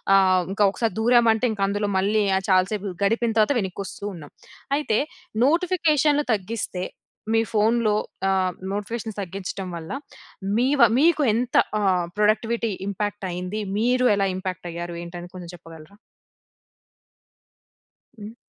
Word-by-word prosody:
ఆహ్, 185 -2 +4
ఇంకా 205 +1 +3
ఒకసారి 225 0 -1
దూరామంటే 235 0 +4 0.2
అందులో, 205 +1 -1
మళ్ళీ 210 +2 +2 0.3
చాలా 185 -1 +5
సేపు 200 -3 -4
గడిపిన 230 +3 +1
తర్వాత 220 +6 +3
వెనక్కి 190 0 -5
వస్తూ - - -10
ఉన్నాం. 150 -4 -11 0.5
అయితే 225 -8 +1 0.5
నోటిఫికేషన్లు 310 -3 +2
తగ్గిస్తే, 195 -2 -4 0.5
మీ 225 - +4
ఫోనులో, 220 0 +2 0.4
ఆహ్, 190 -1 +1 0.2
నోటిఫికేషన్ 215 +2 -4
తగ్గించడం 190 0 -5
వల్ల, 160 -1 -8 0.7
మీవ 265 +4 +2 0.2
మీకు 315 +1 +4
ఎంత, 240 +2 -2 0.3
ఆహ్, 185 -3 +2
ప్రొడక్టివిటీ 220 +2 +1 0.2
ఇంపాక్ట్ 205 0 -3
అయింది? 180 +4 -4 0.2
మీరు 250 +2 +3
ఎలా 195 -1 +2
ఇంపాక్ట్ 185 -1 -5
అయ్యారు 170 +1 -5
ఏంటి 170 +1 -8
అని 175 0 -11
కొంచెం 175 -2 -8
చెప్పగలరా? 165 +1 -14 2.2
హ్మ్. 210 +2 -9
205 Hz, 125 wpm, -24 LUFS, 185-235 Hz, 2.2 s, చాలా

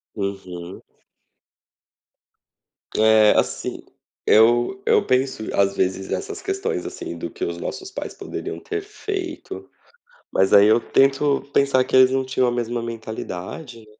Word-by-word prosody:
Uhum. 95 -3 -6 2.1
É 110 -1 +6
assim, - - -1 0.4
eu 120 - +4
eu - - +3
penso 130 -2 0
às 100 0 +2
vezes 95 +1 -1
essas 95 - -4
questões, 390 - -2
assim, 85 - -6
do 85 - -5
que - - -7
os 85 0 -4
nossos 380 - -6
pais - - -6
poderiam - - -6
ter 420 -1 -4
feito, 390 -4 -6 0.6
mas 95 0 +2
aí 100 +1 +8
eu 110 +2 +5
tento 135 +2 +2
pensar 140 -2 +3
que - - -7
eles 130 0 +7
não 135 0 0
tinham 130 -1 +1
a - - 0
mesma 120 0 -2
mentalidade, 115 - -7
né. 110 - -18
115 Hz, 135 wpm, -22 LUFS, 100-135 Hz, 2.1 s, aí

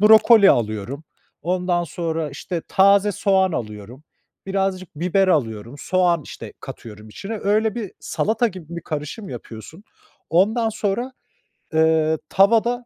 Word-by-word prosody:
brokoli 215 -1 +7
alıyorum. 115 +5 -1 0.4
Ondan 180 0 0
sonra, 165 -1 -3
işte, 165 +4 -5
taze 200 +1 +4
soğan 190 -1 +2
alıyorum. 110 +1 -6 0.4
Birazcık 190 -2 -1
biber 185 +4 +1
alıyorum. 115 - -1
Soğan, 175 -2 +1
işte, - - -9
katıyorum 105 -1 -10
içine. 200 - -6
Öyle 215 +1 +1
bir 220 -6 -5
salata 225 +2 0
gibi 170 -4 -10
bir 170 - -6
karışım 155 +8 -5
yapıyorsun. 120 - -10 0.5
Ondan 220 +7 +3
sonra 220 +4 -2 0.6
eee, 160 0 +3
tavada 230 +5 +3
180 Hz, 120 wpm, -21 LUFS, 150-200 Hz, 0.6 s, brokoli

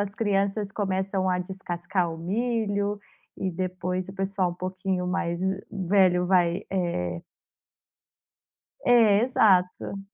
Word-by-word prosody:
as 205 0 -3
crianças 200 -1 0
começam 190 -1 -1
a 180 0 +1
descascar 180 -1 -3
o - - -7
milho 205 +1 -1 0.4
e 190 - -2
depois 185 +1 -3
o 190 - -7
pessoal 195 -1 -1
um 175 - -7
pouquinho 185 0 -3
mais 170 -1 -1 0.3
velho 185 -2 +3
vai, 175 -2 +2
eh 170 - -2 1.6
É, 225 -4 +5
exato. 195 -5 +2
190 Hz, 115 wpm, -26 LUFS, 180-200 Hz, 1.6 s, É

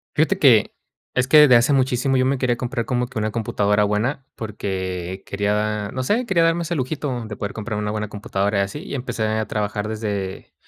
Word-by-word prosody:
Fíjate - - +2
que - - +4 0.4
es 125 0 +2
que 155 - +6
desde 145 -4 +8
hace 120 +4 +4
muchísimo, 130 0 +2
yo 130 - +3
me 135 +1 +1
quería 125 -1 +1
comprar 120 -1 -3
como 125 -1 -1
que 120 - -9
una 110 0 -1
computadora 105 -2 +1
buena, 110 +7 0
porque 95 -4 -4
quería 105 +1 -1
No 130 - -3
sé, 230 - 0
quería 175 -5 +3
darme 165 +1 +2
ese 170 +1 -2
lujito 130 -3 -3
de 110 -1 -6
poder 100 -1 -5
comprar 105 -1 -4
una 105 0 -2
buena 105 0 -3
computadora 100 -1 -1
y - - +4
así. 100 +9 -3
Y - - -7
empecé 125 -4 -3
a 110 0 -1
trabajar 105 0 -2
desde 105 -3 -4
110 Hz, 210 wpm, -22 LUFS, 105-130 Hz, 0.4 s, desde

